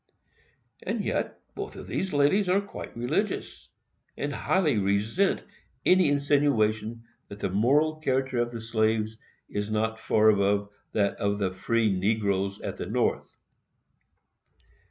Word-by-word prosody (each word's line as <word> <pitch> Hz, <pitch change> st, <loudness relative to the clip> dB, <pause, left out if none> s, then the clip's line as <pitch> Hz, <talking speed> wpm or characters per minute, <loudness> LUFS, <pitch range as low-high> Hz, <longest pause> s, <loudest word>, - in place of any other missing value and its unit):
And -, -, -2 dB
yet, -, -, -2 dB
both -, -, -6 dB
of -, -, -8 dB
these 190 Hz, -, -2 dB
ladies 150 Hz, +7 st, +3 dB
are 190 Hz, +2 st, +4 dB
quite 200 Hz, -10 st, -8 dB
religious, 150 Hz, -, -2 dB, 0.5 s
and -, -, -2 dB
highly 155 Hz, -, +1 dB
resent 105 Hz, -, +1 dB, 0.4 s
any 185 Hz, -4 st, +5 dB
insinuation 120 Hz, -6 st, +1 dB, 0.2 s
that 100 Hz, -, -10 dB
the 100 Hz, -2 st, -2 dB
moral 145 Hz, +10 st, +3 dB
character 130 Hz, -4 st, 0 dB
of 120 Hz, 0 st, +1 dB
the 115 Hz, -1 st, -6 dB
slaves 110 Hz, -1 st, 0 dB, 0.3 s
is 105 Hz, 0 st, -3 dB
not 110 Hz, +1 st, -1 dB
far 110 Hz, -1 st, +4 dB
above 100 Hz, 0 st, +2 dB, 0.2 s
that 100 Hz, -2 st, +1 dB
of 100 Hz, 0 st, 0 dB
the 95 Hz, -2 st, -1 dB
free 110 Hz, +2 st, +1 dB
negroes 100 Hz, 0 st, 0 dB
at -, -, -5 dB
the -, -, -5 dB
North. -, -, -1 dB
110 Hz, 135 wpm, -27 LUFS, 105-145 Hz, 0.5 s, any